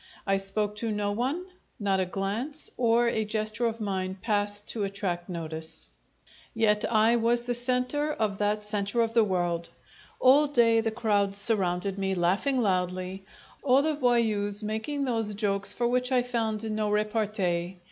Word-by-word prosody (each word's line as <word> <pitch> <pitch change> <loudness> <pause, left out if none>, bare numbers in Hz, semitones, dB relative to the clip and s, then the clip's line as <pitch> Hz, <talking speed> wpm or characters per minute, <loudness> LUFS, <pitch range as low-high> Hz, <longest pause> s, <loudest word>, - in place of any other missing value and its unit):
I 195 -1 +2
spoke 205 +2 -2
to 225 +1 -2
no 205 -1 -1
one; 265 - -2 0.3
not 195 -2 +1
a 185 - 0
glance 210 - 0
or 235 0 +2
a 220 -2 0
gesture 215 +2 -1
of 230 0 -4
mine 190 -2 -3
passed 205 -1 -1
to 220 - -2
attract 195 -3 -3
notice. 160 -2 -2 0.7
Yet 210 -1 +1
I 225 +1 +4
was 235 +1 +1
the 245 0 -2
centre 250 +5 0
of 215 -8 -2
that 210 0 0
centre 210 +2 -1
of 225 0 0
the 230 -1 +5
world. 175 -4 -1 0.5
All 280 +4 +5
day 230 -5 +3
the 225 - -1
crowds 205 -3 0
surrounded 195 -2 0
me, 190 -1 -1
laughing 195 +10 +1
loudly; 185 0 -2 0.4
all 270 +1 +4
the 315 0 +1
voyous 220 -6 +2
making 220 +7 -2
those 225 -4 -1
jokes 200 -1 +1
for 240 - +1
which 250 +1 0
I 250 -1 +3
found 225 -3 -2
no 215 0 -1
repartee. 205 -4 -1
215 Hz, 160 wpm, -27 LUFS, 195-235 Hz, 0.7 s, the